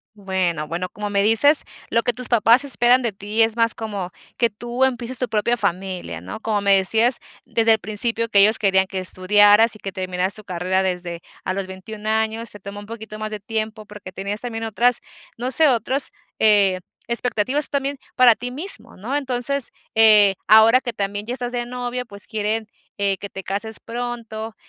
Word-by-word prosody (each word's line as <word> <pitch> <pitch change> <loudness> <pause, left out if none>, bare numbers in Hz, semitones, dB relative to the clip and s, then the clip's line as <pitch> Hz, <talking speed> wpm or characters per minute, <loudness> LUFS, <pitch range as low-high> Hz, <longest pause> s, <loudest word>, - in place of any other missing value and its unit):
Bueno, 185 -6 -2
bueno, 175 +3 -4
como 205 +2 -6
me 200 - +2
dices, 225 +8 +4 0.3
lo 230 - +2
que 245 - 0
tus 250 +1 -8
papás 235 +2 +4
esperan 250 -2 +4
de 230 - 0
ti 205 +3 0
es 225 0 0
más 230 -1 +1
como 200 -5 -5 0.3
que 235 -1 +2
tú 240 +4 -3
empieces 255 -1 -1
tu 250 - -1
propia 230 +3 0
familia, 180 - -3
¿no? 90 - -8
Como 220 -1 -1
me 200 -1 +4
decías, 225 +6 +2 0.3
desde 225 -1 +3
el 220 - +1
principio 225 +3 0
que 205 -3 +3
ellos 215 +3 +6
querían 190 -2 +2
que 190 - -6
estudiaras 205 +4 +4
y 215 - -14
que 195 - -6
terminaras 185 +1 -2
tu 215 - -9
carrera 185 0 -1
desde 180 -2 -3 0.2
a 185 - -2
los 195 -1 -4
21 210 +3 -7
años, 220 +1 -1
se 205 - -9
tomó 200 +1 -9
un 205 - -11
poquito 220 -1 -9
más 215 0 -4
de 215 - -6
tiempo 215 +1 -4
porque 205 -3 -11
tenías 200 +3 -3
también 225 -2 -5
otras, 235 +2 +2 0.4
no 250 +2 -3
sé, 315 +2 +7
otros, 260 +2 +2 0.3
eh, 200 -4 +4 0.3
expectativas 250 +4 0
tú - - -10
también 280 -1 -2 0.2
para 250 -2 +7
ti 245 +3 -6
mismo, 255 - -5
¿no? 235 +9 -4
Entonces, 270 -1 0 0.2
eh, 215 -3 +6
ahora 220 +4 +6
que 240 -3 -5
también 205 0 -4
ya 240 - -3
estás 245 -1 -5
de 240 -1 -3
novio, 250 0 -4
pues 200 -2 -4
quieren, 220 0 -2 0.3
eh, 200 -1 0
que 200 - -8
te 195 - -8
cases 205 +3 -2
pronto. 230 -2 -6
220 Hz, 195 wpm, -21 LUFS, 200-240 Hz, 0.4 s, sé